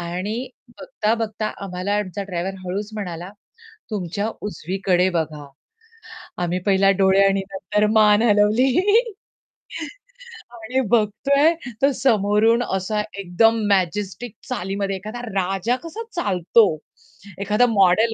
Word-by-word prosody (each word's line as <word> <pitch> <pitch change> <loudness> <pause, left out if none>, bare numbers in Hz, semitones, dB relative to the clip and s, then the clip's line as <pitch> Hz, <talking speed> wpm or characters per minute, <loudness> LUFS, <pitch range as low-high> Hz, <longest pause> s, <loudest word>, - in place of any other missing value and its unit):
आणि 180 +5 -4 0.4
बघता-बघता 225 - -2 0.2
आम्हाला 185 +2 -3
आमचा 200 0 -4
ड्रायव्हर 185 0 -4
हळूच 200 +4 -4
म्हणाला 180 -3 -6 0.6
तुमच्या 200 +1 -2
उजवीकडे 185 -1 0
बघा. 155 -4 -3 1.0
आम्ही 175 +1 -1
पहिला 195 0 +4
डोळे 195 0 +4
आणि 195 0 +2
नंतर 195 +2 0
मान 210 -1 +5
हलवली. 215 +4 +3 1.8
आणि 235 +3 -3
बघतोय, 275 +8 +3 0.3
तर 275 - +4
समोरून 225 0 +3
असा 190 +1 -2 0.2
एकदम 225 +5 +2
मॅजेस्टिक 200 +4 -1
चालीमध्ये 195 +2 -2
एखादा 215 +5 -7
राजा 195 +2 -1
कसा 335 +8 -6
चालतो 200 - +3 0.8
एखादा 210 +5 +3
मॉडेल 215 +2 +3
205 Hz, 105 wpm, -21 LUFS, 185-225 Hz, 1.8 s, मान